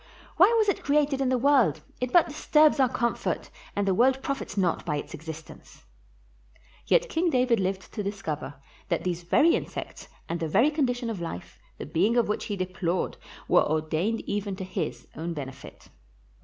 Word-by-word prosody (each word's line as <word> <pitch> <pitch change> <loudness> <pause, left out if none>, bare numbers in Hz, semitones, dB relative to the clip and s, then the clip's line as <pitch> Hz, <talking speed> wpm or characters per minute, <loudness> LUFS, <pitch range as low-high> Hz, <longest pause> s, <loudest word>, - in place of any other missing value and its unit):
Why 365 +4 +8
was 435 -2 +3
it 400 - 0
created 285 -1 +2
in 265 - +1
the 255 - +2
world? 240 - +3 0.2
It 250 0 -2
but 345 - +5
disturbs 305 0 +3
our 260 -2 +4
comfort, 235 0 -2 0.2
and 200 0 0
the 190 - +3
world 260 +6 +3
profits 275 -7 -4
not 180 -4 +1
by 150 - -1
its - - -6
existence," 160 0 -10 1.0
Yet - - +3
King 340 +2 +1
David 250 -5 +2
lived 190 0 -3
to 210 - -3
discover 180 -8 -4 0.3
that - - 0
these 180 -1 -2
very 300 - +4
in - - -1
sects, - - -8 0.2
and 170 +1 -3
the 165 - -2
very 245 - +3
condition 245 -6 -1
of 195 -6 -5
life, 165 - -7 0.2
the - - -6
being 185 +10 +1
of 240 - +3
which 210 - -2
he 205 - -3
deplored, 185 -1 -2 0.3
were - - +5
ordained 155 +8 0
even 200 -1 -3
to 190 - -6
his 125 -9 -4
own 165 +2 -4
benefit. 135 -2 -9
205 Hz, 185 wpm, -27 LUFS, 170-265 Hz, 1.0 s, Why